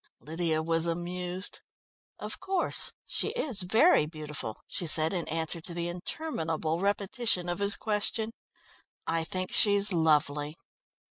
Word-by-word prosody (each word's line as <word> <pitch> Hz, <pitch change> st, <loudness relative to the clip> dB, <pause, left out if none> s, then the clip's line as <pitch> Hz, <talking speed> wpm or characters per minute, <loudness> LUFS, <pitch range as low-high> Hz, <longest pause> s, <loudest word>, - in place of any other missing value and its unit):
Lydia 160 Hz, +3 st, -2 dB
was 165 Hz, +1 st, +2 dB
amused. 180 Hz, +2 st, 0 dB, 0.6 s
"Of -, -, -5 dB
course 380 Hz, -2 st, +1 dB
she -, -, 0 dB
is 275 Hz, -, +1 dB
very 220 Hz, -, +3 dB
beautiful," 150 Hz, -8 st, -6 dB
she 175 Hz, -, -2 dB
said 160 Hz, +2 st, +4 dB
in 175 Hz, -3 st, -3 dB
answer 160 Hz, +1 st, -2 dB
to 170 Hz, +1 st, -3 dB
the 170 Hz, 0 st, -3 dB
interminable 165 Hz, -, -3 dB
repetition 200 Hz, 0 st, 0 dB
of 175 Hz, +2 st, -3 dB
his 200 Hz, 0 st, +5 dB
question. 220 Hz, +1 st, -1 dB, 0.7 s
"I 165 Hz, 0 st, -1 dB
think 185 Hz, +2 st, -4 dB
she's 205 Hz, -1 st, +4 dB
lovely." 150 Hz, -2 st, +1 dB
175 Hz, 130 wpm, -28 LUFS, 160-200 Hz, 0.7 s, his